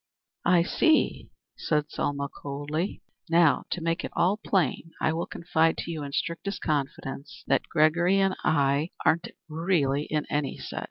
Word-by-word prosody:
"I 175 -1 +5
see," 315 - +2 0.3
said 150 -1 -1
Selma, 140 0 -1
coldly. 145 +6 -4 0.3
"Now, 165 -2 +4
to 180 - -3
make 165 +1 -1
it - - -4 0.3
plain, 165 -3 0
I 160 - +1
will 165 +1 -2
confide 165 -1 +1
to 170 - -4
you 160 -2 -4
in 140 -1 -5
strictest 175 +7 -3
confidence 140 -1 -3
that - - +1
Gregory 170 +4 +3
and 195 -1 +2
I 145 +1 +2 0.2
aren't 165 +1 +3
yet - - -16
really 155 -3 +1
in 150 -1 -1
any 145 -1 -1
set. - - -6
160 Hz, 155 wpm, -27 LUFS, 145-170 Hz, 0.3 s, I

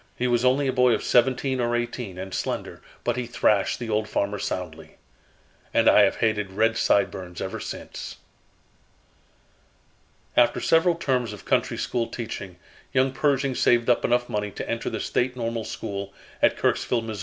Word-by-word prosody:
He 125 - -1
was 120 -1 +2
only 135 +2 +3
a 130 - 0
boy 125 -1 +4
of - - -1
seventeen 130 +2 +2
or 120 0 +1
eighteen 120 -5 -4
and 95 0 -6
slender, - - -4 0.2
but - - 0
he 125 -1 -3
thrashed 105 -4 +2
the 120 -2 -5
old 105 0 0
farmer 100 -1 -1
soundly. 90 -5 -5 0.8
And - - +4
I - - +7
have 100 -1 +4
hated 105 -4 0
red 110 +3 +2
sideburns 95 -4 0
ever - - -4
since." - - -7 2.2
After 120 -1 +4
several 165 +1 +3
terms 125 -8 -1
of 105 - -11
country - - +1
school 120 -2 -1
teaching, 100 -6 -6 0.4
young 130 0 +2
Pershing 135 -1 +1
saved 120 -1 +3
up 120 - +1
enough 120 0 +2
money 105 0 -2
to - - -7
enter 115 0 -2
the - - -4
State 125 +1 -1
Normal 115 -2 -3
School, 100 0 -5 0.3
at - - +4
Kirksville, 120 -2 +1
Mo. 110 -1 -5
120 Hz, 165 wpm, -25 LUFS, 105-125 Hz, 2.2 s, I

